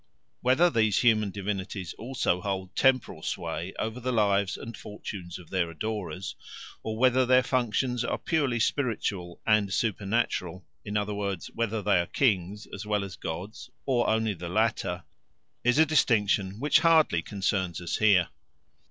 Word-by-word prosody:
Whether 130 +8 +4
these 110 -5 +2
human 110 -4 +4
divinities 95 -2 -4
also 115 -7 -1
hold 95 -1 -4
temporal 130 -11 +2
sway 85 +3 -4
over 110 +2 -3
the 130 +1 -2
lives 100 -4 +2
and 115 0 -8
fortunes 95 -5 -7
of 90 -3 -15
their 90 -3 0
adorers, 95 +1 -4 0.5
or 110 0 -4
whether 130 +1 +4
their 130 0 +4
functions 125 0 0
are - - -1
purely 140 -7 0
spiritual 105 -9 -1
and 110 -3 +3
supernatural, 100 -4 -1 0.2
in 105 0 -2
other 105 0 -1
words, 100 -3 -3
whether 110 -2 -2
they 100 -3 +3
are 85 - -1
kings 105 -5 0
as 100 - -5
well 105 -1 0
as 95 -1 -7
gods 90 +7 -6 0.2
or 125 -3 +2
only 110 -1 +1
the 85 -1 -7
latter, 105 -4 0 0.6
is 125 +2 +3
a 160 - +7
distinction 105 -9 +2
which 150 +3 +4
hardly 160 - +4
concerns 95 -2 -1
us 90 -1 -2
here. 100 -5 +4
105 Hz, 150 wpm, -28 LUFS, 95-120 Hz, 0.6 s, a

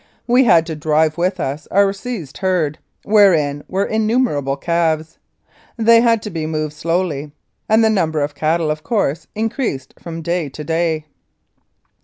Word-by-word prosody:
We 250 +2 +4
had 165 -7 +5
to 160 -1 -5
drive 155 +1 +1
with 185 +2 0
us 145 0 -4
our 200 0 +3
seized 195 - -7
herd, 180 -6 0 0.2
wherein 165 -9 +3
were 195 +2 -1
innumerable 215 - 0
calves. 160 0 -1 0.6
They 230 0 +5
had 230 -2 +2
to 210 - -5
be 160 -2 -3
moved 155 -1 -3
slowly, 155 -2 -2 0.4
and 220 +1 +4
the 220 - +4
number 160 -7 0
of 145 +1 -2
cattle, 155 +1 0
of 155 0 -4
course, 165 - -1
increased 220 - -3
from 165 -1 -7
day 170 -2 -1
to 150 +3 -8
day. 160 0 -1
165 Hz, 155 wpm, -18 LUFS, 155-205 Hz, 0.6 s, had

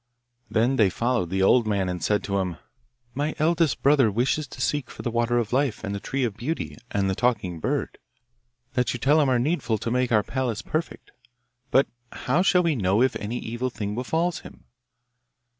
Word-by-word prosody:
Then 120 +4 +2
they 105 -4 +5
followed 115 -2 0
the 95 +1 0
old 115 +3 +4
man, 100 -3 0
and 90 -2 -4
said 105 +3 +1
to 100 0 -1
him, 90 -3 -2 0.6
'My 145 +3 -2
eldest 160 -1 +1
brother 140 -4 +5
wishes 125 +7 0
to - - -12
seek 145 -4 -1
for - - -9
the 120 - -2
water 120 +1 +1
of 115 -1 -1
life, 130 -5 0
and 100 -2 -3
the 100 - -3
tree 135 +5 -2
of 115 -5 -1
beauty, 140 +9 -4
and 100 -1 0
the 95 - +1
talking 105 -7 0
bird, - - -2 0.7
that 125 -3 +1
you - - -5
tell 150 +5 +4
him 140 - +2
are 130 - +3
needful 125 -3 0
to 115 - -4
make 125 0 +1
our 105 -2 +4
palace 125 -4 -2
perfect. 155 +3 -4 0.6
But 135 +1 +4 0.3
how 145 +8 0
shall 180 -1 +4
we 165 -3 +1
know 100 +1 +2
if 130 - +1
any 110 +4 -4
evil 120 +3 -3
thing 105 -4 -4
befall 160 +9 0
him? - - -11
120 Hz, 200 wpm, -25 LUFS, 105-135 Hz, 0.7 s, they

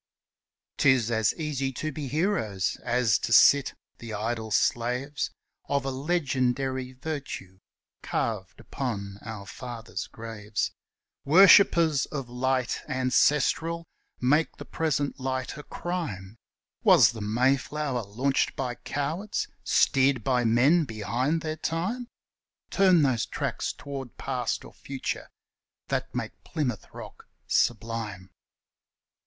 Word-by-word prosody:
'Tis 130 -5 +4
as 110 -1 +3
easy 140 -4 -2
to 155 +4 -4
be 145 -1 -5
heroes 135 - 0
as 120 -4 +2
to - - -3
sit 140 +3 +6 0.2
the 115 -2 -8
idle 110 +1 -3
slaves 125 +6 0 0.4
Of 140 -1 0
a 135 - -1
legendary 130 -3 -1
virtue 130 - -6 0.4
carved - - -3
upon 100 -7 -4
our 110 -3 -7
fathers' 115 +2 -6
graves, 110 -2 -4 0.5
Worshippers 170 -3 +6
of 140 -4 -5
light 125 0 -1
ancestral 150 +6 +2 0.3
make 150 +6 +2
the - - -8
present 145 -3 -1
light 130 -1 -3
a 150 - -7
crime; 145 - -5 0.5
Was - - +7
the 115 -2 -8
Mayflower 130 +4 0
launched 125 +7 0
by 125 -2 -2
cowards, 155 - -3
steered 130 -3 +3
by 125 -2 +2
men 130 +9 +4
behind 120 +7 -1
their 155 0 -3
time? 185 +11 -2 0.6
Turn 185 -5 +5
those 130 -5 +1
tracks - - -2
toward 135 -4 -8
Past - - -2
or - - -13
Future, 135 -1 -5 0.6
that - - -2
make - - -5
Plymouth 130 - -3
rock - - -11 0.2
sublime? 110 -5 -1
130 Hz, 115 wpm, -27 LUFS, 115-150 Hz, 0.6 s, Was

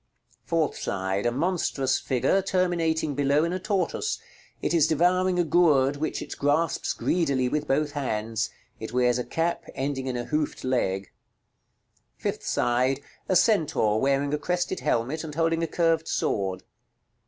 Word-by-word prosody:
Fourth 165 -3 0
side. 95 +2 -1
A - - +2
monstrous 135 -3 0
figure, 135 +9 +1
terminating 170 -5 0
below 140 +2 +2
in 170 +1 -1
a 185 - -2
tortoise. 200 - -1 0.4
It - - -1
is 165 -3 +4
devouring 180 +3 +2
a 175 - +3
gourd, 150 -5 +3
which 155 +2 -2
it - - -7
grasps 145 +4 +1
greedily 140 -7 +1
with 150 +3 -1
both 145 +2 +1
hands; 115 -5 -2 0.3
it 110 +1 -7
wears 125 -1 +2
a - - -1
cap 165 +5 -1
ending 135 -1 -2
in 125 -1 -2
a 120 - -3
hoofed 150 -1 -2
leg. 100 -7 -1 1.1
Fifth - - -3
side. 130 +3 +1 0.3
A 185 - +3
centaur 155 - +3
wearing 140 +1 +1
a 150 - 0
crested 180 +3 -1
helmet, 130 +8 -1
and 150 -2 -7
holding 165 0 +1
a 165 - 0
curved 165 -1 +1
sword. 95 -2 -1
145 Hz, 155 wpm, -26 LUFS, 125-170 Hz, 1.1 s, is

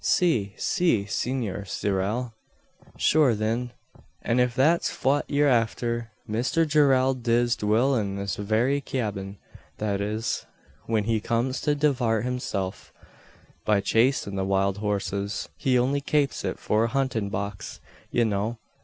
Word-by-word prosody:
"Si 115 - +2
Si! 140 - +1
Senor 110 -2 -2
Zyerral." 105 +6 -2 0.6
"Shure, 145 -7 +4
thin, 115 +3 -1 0.5
an 120 +2 +1
if 125 -1 +2
that's 155 +7 +3
fwhat 140 +2 +1
ye're 145 0 +2
afther, 120 -1 0 0.2
Misther 125 +9 +1
Gerrald 135 -4 +3
diz 120 0 +2
dwill 110 +6 +2
in 100 -4 -1
this 100 -1 -3
very 115 +7 +1
cyabin 100 -7 -3 0.4
that 100 -2 -1
is, 110 +3 -2 0.4
whin 110 -2 +1
he 110 +1 +1
comes 120 +4 -1
to 150 -1 +1
divart 125 -7 +1
hisself, 100 -7 -3 0.7
by 105 -2 +3
chasin' 115 -1 +1
the 95 - -1
wild 95 +1 +1
horses. 100 -1 -2
He 130 -2 +1
only 135 +3 +1
kapes 145 -1 0
it - - -2
for 110 +2 +1
a - - +1
huntin' 125 -5 -1
box, 100 +1 -5 0.3
ye 120 - +2
know. 110 +2 -1
115 Hz, 135 wpm, -26 LUFS, 100-130 Hz, 0.7 s, Shure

